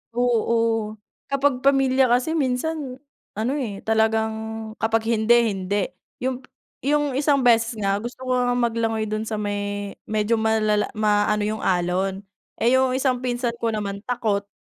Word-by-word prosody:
Oo. 230 -2 +1 0.3
Kapag 275 -2 +1
pamilya 270 -2 +3
kasi 250 +6 +2
minsan 275 -1 -1 0.4
ano, 225 +4 0
eh, 230 -9 -3
talagang 220 0 +2 0.5
kapag 225 0 +1
hindi, 230 0 +3
hindi. 190 +1 -3 0.5
Yung 260 0 -1 0.4
yung 295 +1 +1
isang 280 0 +2
beses 230 -1 +4
nga 200 -1 0
gusto 240 +3 -7
ko 255 - -2
ngang 245 0 +1
maglangoy 225 -1 0
do'n 215 +1 -3
sa 215 - -2
may 205 -1 -3 0.2
medyo 215 +1 +1
malala 215 -1 +2
maano 210 0 +2
yung 215 +1 -2
alon, 185 +2 0 0.3
eh 235 - +2
yung 260 -1 +3
isang 260 -2 +1
pinsan 245 -1 -1
ko 230 - +1
naman 200 -2 -3
takot. 215 -5 -1
225 Hz, 145 wpm, -23 LUFS, 210-255 Hz, 0.5 s, beses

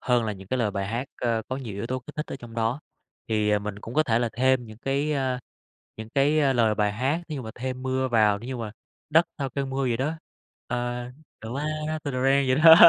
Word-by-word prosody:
hơn 125 -2 +2
là 110 - -1
những 95 -1 -11
cái 130 - 0
lời 110 -4 +2
bài 100 -1 -2
hát, 120 +6 -2
ơ, 115 -2 +1
có 130 - -2
nhiều 120 -7 -5
yếu 100 +3 -3
tố 130 +1 -1
kích 150 +5 -12
thích 150 - -2
ở - - -5
trong 120 -3 -11
đó. 115 +4 0 0.5
Thì, 105 -1 +2
ờ, 105 - +4
mình 105 0 -5
cũng 115 - -7
có 155 - +5
thể 115 -6 +2
là 120 -1 +1
thêm 130 0 +3
những 110 0 -11
cái, 140 +3 0
ơ, 130 -3 0 0.6
những 110 0 -7
cái 140 0 +3
lời 115 -3 +4
bài 105 -1 +2
hát, 135 +9 0
thí 155 - -3
dụ 135 - -4
mà 110 - -6
thêm 130 +1 -4
mưa 130 0 0
vào, 105 -4 +4
để 115 - -9
như 130 0 -3
mà 110 -3 -4 0.4
đất 165 +2 +6
sau 135 -1 -2
cơn 135 +1 -2
mưa 135 +1 -1
vậy 120 -3 +1
đó, 140 +6 0 0.5
ờ, 120 0 -2 0.4
the 110 - -6
ground 155 +3 -2
after 155 -3 -3
the 125 - -1
rain 135 +1 +4
vậy 130 - +4
đó. 160 -1 +13
125 Hz, 260 wpm, -26 LUFS, 115-135 Hz, 0.6 s, đó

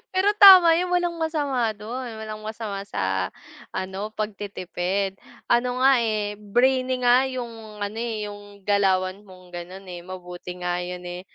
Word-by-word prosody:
Pero 385 +2 +4
tama 370 -4 +10
'yon, 360 0 -1
walang 350 -1 +1
masama 285 -7 0
dun. 240 +4 -6
Walang 215 -1 -7
masama 215 -2 -5
sa 95 - -1 0.4
ano, 190 +3 -4
pagtitipid 195 -2 -3 0.3
ano 245 +1 +1
nga, 265 -3 +6
eh, 210 -2 -1
brainy 255 +4 +1
nga 250 +2 +5
yung 225 -4 -7
ano, 205 +2 -4
eh, 225 -3 -3
yung 205 -1 -13
galawan 195 -1 +1
mong 185 -1 -16
ganon, 180 +3 -8
eh. 175 -1 -8
Mabuti 180 0 -8
nga 180 0 -1
yun, 180 0 -6
eh, 175 0 -6
210 Hz, 150 wpm, -24 LUFS, 185-245 Hz, 0.4 s, tama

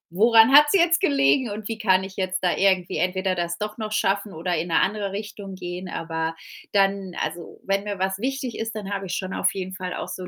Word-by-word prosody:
Woran 225 +3 +6
hat's 295 +3 +8
jetzt 340 -2 +4
gelegen 140 - +3
und 210 0 -6
wie 225 -1 -4
kann 190 -3 +3
ich 190 0 -9
jetzt 185 -1 -2
da 180 - +2
irgendwie 190 -3 +2
entweder 185 +2 0
das 170 0 -2
doch 210 +1 -5
noch 215 -1 -4
schaffen 200 -1 0
oder 170 +2 -2
in 165 +3 -2
'ne 165 - +3
andere 200 -1 -1
Richtung 200 -1 -7
gehen?“ 180 0 -6
Aber 165 0 -3 0.4
dann 195 -2 +1
also, 165 +1 -5
wenn 195 +1 0
mir 205 -2 -4
was 190 +1 -1
wichtig 265 0 -3
ist, 225 0 -4
dann 205 -2 -6
habe 195 -1 -4
ich 180 - -4
schon 185 0 -4
auf - - +1
jeden 185 -1 -5
Fall 185 -1 -5
auch - - -5
so 185 -1 -6
195 Hz, 230 wpm, -24 LUFS, 180-210 Hz, 0.4 s, hat's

